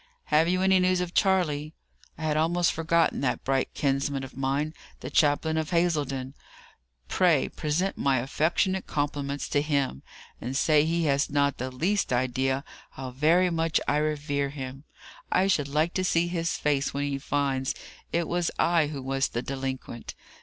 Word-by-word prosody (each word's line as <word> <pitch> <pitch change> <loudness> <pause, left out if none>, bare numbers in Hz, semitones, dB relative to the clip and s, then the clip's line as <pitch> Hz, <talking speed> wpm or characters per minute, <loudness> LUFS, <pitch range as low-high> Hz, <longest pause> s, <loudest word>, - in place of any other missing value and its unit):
Have 155 +2 +5
you 185 +1 +1
any 190 0 +5
news 185 0 +2
of 180 -1 -3
Charley?" 160 -6 +1 0.4
"I 160 - -7
had 155 -1 +1
almost 170 +3 +2
forgotten 165 -1 +1
that 130 -3 -1
bright 135 0 0
kinsman 135 -1 0
of 135 - -9
mine, 135 +4 -1 0.3
the - - -6
chaplain 160 +1 +2
of 160 -1 -1
Hazledon. 145 -7 0 0.7
Pray 170 -7 +3
present 165 +6 -2
my 135 -1 +2
affectionate 160 +8 0
compliments 145 -1 -2
to 145 - +2
him, 140 - -1 0.4
and 130 +3 -3
say 150 0 +4
he 170 +1 0
has 140 -2 +2
not 140 -1 +1
the 130 +1 -2
least 175 +10 0
idea 130 +2 0 0.3
how 130 -1 -6
very 165 +7 +3
much 165 -1 +1
I 145 - +2
revere 145 -2 -1
him. 135 0 -7 0.5
I 185 - +3
should 155 -8 +1
like 155 +4 0
to 185 - 0
see 170 -1 +2
his 170 -1 -1
face 140 -2 0
when 140 - -1
he 140 -1 -2
finds 135 -2 -1 0.4
it 170 0 0
was 175 -1 0
I 165 -3 +3
who 145 -3 -6
was 135 +1 0
the 120 - -4
delinquent. 130 -3 -5
150 Hz, 165 wpm, -27 LUFS, 135-170 Hz, 0.7 s, Have